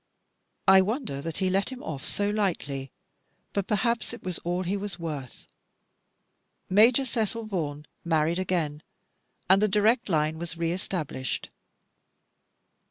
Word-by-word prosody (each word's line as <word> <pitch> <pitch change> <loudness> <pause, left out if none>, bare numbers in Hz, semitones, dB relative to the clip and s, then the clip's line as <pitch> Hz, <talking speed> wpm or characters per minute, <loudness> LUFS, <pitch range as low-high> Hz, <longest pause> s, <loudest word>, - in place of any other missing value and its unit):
I 190 0 +9
wonder 210 - -2
that 165 +1 -4
he 185 -1 +1
let 195 +6 +1
him 260 0 -8
off 140 -4 -5
so 205 0 +1
lightly; 145 -10 -1 0.6
but 200 -2 -1
perhaps 235 +2 0
it 235 - -9
was 185 -2 -3
all 175 +2 -1
he 185 +3 -1
was 200 -1 -4
worth. 150 -7 -6 1.3
Major 230 +7 +6
Cecil 230 -2 -1
Vaughan 150 -8 -3 0.2
married 165 +1 +2
again, 165 -5 -1 0.7
and 190 +3 +6
the 215 - +5
direct 215 +4 +3
line 155 -1 +1
was 170 0 -5
re 165 0 0
established. 165 -7 -3
185 Hz, 135 wpm, -27 LUFS, 160-210 Hz, 1.3 s, I